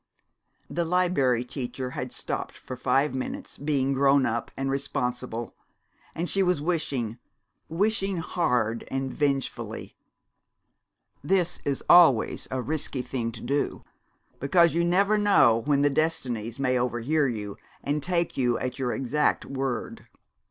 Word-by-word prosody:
The 170 - -1
Liberry 165 -9 +2
Teacher 125 0 -5
had - - -5
stopped, - - -4
for 130 - -8
five 135 +3 +1
minutes, 130 -1 -5
being 140 -2 +1
grown 135 0 +4
up 115 +1 -2
and 135 0 -1
responsible, 125 -3 -3 0.6
and 170 +2 -2
she 195 - +2
was 180 -4 +2
wishing 140 -8 -2 0.5
wishing 195 +2 0
hard 125 -10 0
and 135 -1 -2
vengefully. 140 -3 -2 1.3
This 175 +2 +1
is 140 -2 -1
always 160 -10 +5
a 130 -1 -2
risky 140 -3 -3
thing 120 -2 -3
to - - -9
do, 140 +4 -1 0.6
because 170 +4 +4
you 170 +1 +2
never 195 +5 +3
know 135 - +5
when 140 -1 +3
the 145 - +5
Destinies 125 -7 -1
may 130 -2 +1
overhear 125 +5 +1
you 105 -4 -4 0.3
and 145 +1 -1
take 170 +2 -1
you 125 -3 +1
at 130 +1 -4
your 125 -2 0
exact 135 +3 0
word. 135 -4 -4
135 Hz, 135 wpm, -26 LUFS, 125-165 Hz, 1.3 s, always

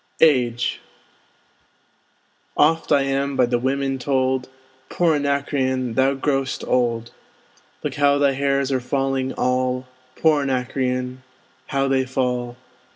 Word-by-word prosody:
AGE 125 -6 +3 1.8
Oft 160 +2 +3
am 140 0 +1
I - - -5
by 125 - +4
the 120 0 0
women 135 +1 -1
told, 130 -1 0 0.4
Poor 170 -2 +2
Anacreon, 140 -3 0
thou 135 +3 +2
grow'st 135 -1 -1
old! 120 -2 0 0.7
Look - - -2
how 145 -1 +3
thy 140 -1 +3
hairs 140 0 0
are 130 - +1
falling 135 0 -1
all; 125 0 0 0.3
Poor 155 -2 +3
Anacreon, 130 -1 -2 0.5
how 135 -1 0
they 135 -1 +1
fall! 125 -2 -2
135 Hz, 115 wpm, -22 LUFS, 125-140 Hz, 1.8 s, by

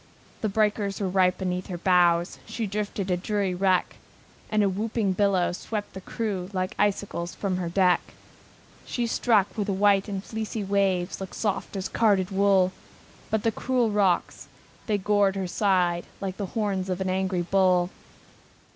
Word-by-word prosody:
The 215 - 0
breakers 205 -1 0
were 200 - -1
right 185 -1 +2
beneath 180 -1 -3
her 180 - -4
bows, 175 -1 +3
She 220 +1 -3
drifted 205 -1 -3
a 180 0 0
weary 200 -3 +1
wreck, 185 0 +1 0.5
And 215 -1 +2
a - - +3
whooping 205 +1 -1
billow 190 -2 +2
swept 205 +3 -5
the 190 - -7
crew 195 -3 -3
Like 185 0 -2
icicles 195 -4 -1
from 190 -3 -2
her 175 -2 -2
deck. 180 0 +3 0.8
She 240 - -2
struck 225 -3 +2
where 210 -3 -1
the 200 - -1
white 200 +1 +3
and 195 -2 -4
fleecy 220 -1 -4
waves 195 -2 0
Looked 190 - -7
soft 200 -2 -2
as 190 -1 -2
carded 200 -4 +2
wool, 195 -1 +3 0.6
But 220 -1 0
the 225 - +2
cruel 245 0 0
rocks, 200 -4 +1 0.4
they 210 -2 +2
gored 200 0 +2
her 190 -1 -2
side 180 -2 +1
Like 190 -1 -4
the 200 - -3
horns 195 -3 -1
of 185 0 -2
an 190 0 -1
angry 190 -1 0
bull. 185 -1 +2
195 Hz, 165 wpm, -26 LUFS, 185-205 Hz, 0.8 s, bows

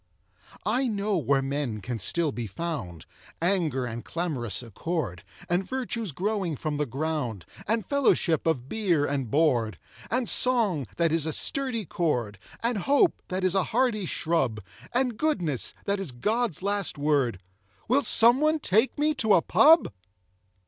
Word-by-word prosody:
I 250 +6 +1
know 205 -2 -1
where 140 -4 +1
Men 135 -5 -2
can 115 +3 -5
still 165 +3 +1
be 120 -3 -5
found, 105 - -5 0.3
Anger 165 -8 0
and 115 0 -6
clamorous 140 - -3
accord, 115 - -4 0.2
And 175 +2 +1
virtues 235 -4 -3
growing 190 0 -2
from 150 +2 -3
the 150 -1 -1
ground, 135 - -3 0.2
And 225 0 0
fellowship 210 - +1
of 130 -6 0
beer 175 -6 +1
and 135 -5 -2
board, 125 -7 +1 0.3
And 245 0 0
song, 215 - +3
that 165 -1 +2
is 160 -1 0
a - - -1
sturdy 250 - 0
cord, 120 - -2 0.2
And 235 -2 0
hope, 285 - +2
that 185 +1 -3
is 185 -1 +2
a 195 -1 +2
hardy 225 -5 0
shrub, 135 -10 -1 0.3
And 250 -2 0
goodness, 180 - -1
that 200 0 0
is 190 -8 -4
God's 210 - -1
last 200 -4 -1
word 140 -8 +1 0.5
Will 260 +5 +3
someone 265 +6 +5
take 225 -3 +1
me 305 +1 +2
to 220 -7 +3
a 170 - +3
pub? 320 - +5
170 Hz, 150 wpm, -26 LUFS, 135-225 Hz, 0.5 s, someone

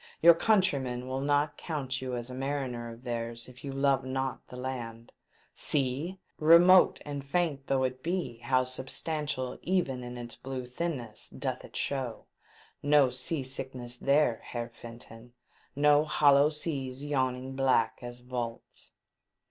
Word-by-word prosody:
"Your 170 +1 +9
countrymen 140 - +1
will 130 +1 -2
not 145 +1 +1
count 135 -5 -3
you 130 -1 -3
as 120 +1 -5
a - - -6
mariner 130 -3 -3
of 115 +2 -12
theirs 115 -1 -4
if 125 -1 -14
you 140 - -4
love 135 -1 +2
not 130 0 -3
the - - -11
land! 120 -3 -6 0.4
See! 145 +7 -1 0.2
Remote 170 +4 +7
and 145 -1 -5
faint 140 -2 -1
though 135 -1 +2
it 130 0 -2
be, 165 -8 -2
how 130 +2 +2
substantial 130 +1 -2
even 160 -9 0
in 125 0 -7
its 120 -1 -7
blue 130 -1 -5
thinness 125 -4 -5
doth - - -4
it - - -13
show! 130 -5 -3 0.6
No 145 -3 +5
sea 135 +4 -2
sickness 130 -2 -6
there, 140 -4 +2
Heer 120 -1 -3
Fen 115 0 -10
ton! 120 +1 -13 0.4
No 145 +1 +5
hollow 145 -1 +5
seas 140 -3 -4
yawning 130 -2 -1
black 130 -4 +2
as 120 0 -8
vaults 120 -2 -6
130 Hz, 150 wpm, -30 LUFS, 125-145 Hz, 0.6 s, Your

